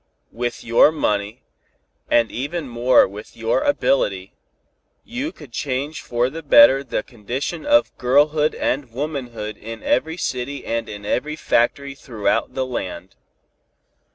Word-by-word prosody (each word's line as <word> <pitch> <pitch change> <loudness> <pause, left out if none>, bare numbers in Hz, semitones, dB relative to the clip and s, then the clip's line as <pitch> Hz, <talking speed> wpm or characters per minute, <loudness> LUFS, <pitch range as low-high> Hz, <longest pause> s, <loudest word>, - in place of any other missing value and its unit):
With 120 0 -4
your 115 +6 +5
money, 105 -7 -2 0.7
and 115 -2 +3
even 145 +4 -4
more 120 +1 +4
with 105 +2 -11
your 115 - +1
ability, - - +1 0.7
you 260 +7 -4
could 145 -6 -14
change 140 +4 -3
for 120 +1 0
the 160 +5 -6
better 135 -2 +7
the 135 - -3
condition 130 - -5
of 295 0 +3
girlhood 150 +4 +3
and 130 -2 -2
womanhood 120 -6 -5
in 115 +1 -9
every 160 +6 0
city 135 -2 -3
and 115 0 -2
in 105 -1 -8
every 150 +8 -1
factory 140 0 0
throughout 115 -6 -2
the 130 - 0
land. 95 -7 -5
130 Hz, 130 wpm, -21 LUFS, 115-150 Hz, 0.7 s, better